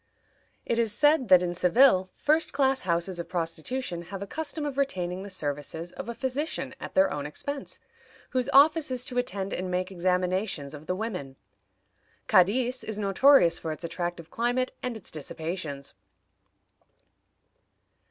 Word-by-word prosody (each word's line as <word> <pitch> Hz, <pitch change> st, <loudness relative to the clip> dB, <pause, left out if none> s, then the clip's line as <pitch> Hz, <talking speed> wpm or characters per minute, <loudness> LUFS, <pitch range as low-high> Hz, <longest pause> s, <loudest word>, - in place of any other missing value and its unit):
It 235 Hz, -, 0 dB
is 230 Hz, -2 st, +1 dB
said 295 Hz, +3 st, +3 dB
that 180 Hz, -2 st, +7 dB
in 175 Hz, -1 st, -1 dB
Seville 185 Hz, +2 st, +4 dB
first 310 Hz, +2 st, +1 dB
class 270 Hz, -1 st, +2 dB
houses 170 Hz, +2 st, 0 dB
of 170 Hz, -, -5 dB
prostitution 175 Hz, +4 st, -2 dB
have 195 Hz, 0 st, -5 dB
a -, -, -5 dB
custom 310 Hz, +6 st, -3 dB
of 285 Hz, -2 st, -3 dB
retaining 185 Hz, -9 st, -1 dB
the 200 Hz, -, -7 dB
services 160 Hz, 0 st, -4 dB
of 230 Hz, -, -7 dB
a 235 Hz, -, -4 dB
physician 275 Hz, +5 st, -3 dB
at -, -, -8 dB
their 285 Hz, 0 st, +4 dB
own 145 Hz, 0 st, -3 dB
expense, 285 Hz, -, -6 dB, 0.5 s
whose 255 Hz, -2 st, 0 dB
office 305 Hz, +2 st, +5 dB
is 250 Hz, -1 st, -2 dB
to 250 Hz, -1 st, -1 dB
attend 195 Hz, -5 st, -3 dB
and 185 Hz, 0 st, -3 dB
make 180 Hz, +1 st, -1 dB
examinations 180 Hz, -4 st, -1 dB
of 150 Hz, +1 st, -10 dB
the 180 Hz, -, 0 dB
women. 185 Hz, -11 st, -5 dB, 0.9 s
Cadiz 245 Hz, +7 st, +3 dB
is 215 Hz, -1 st, -4 dB
notorious 205 Hz, 0 st, +5 dB
for 160 Hz, -, -4 dB
its 155 Hz, +2 st, -6 dB
attractive 175 Hz, 0 st, -4 dB
climate 245 Hz, +2 st, 0 dB
and 250 Hz, -3 st, -3 dB
its 205 Hz, -, -7 dB
dissipations. 155 Hz, -2 st, -5 dB
190 Hz, 150 wpm, -27 LUFS, 175-255 Hz, 0.9 s, that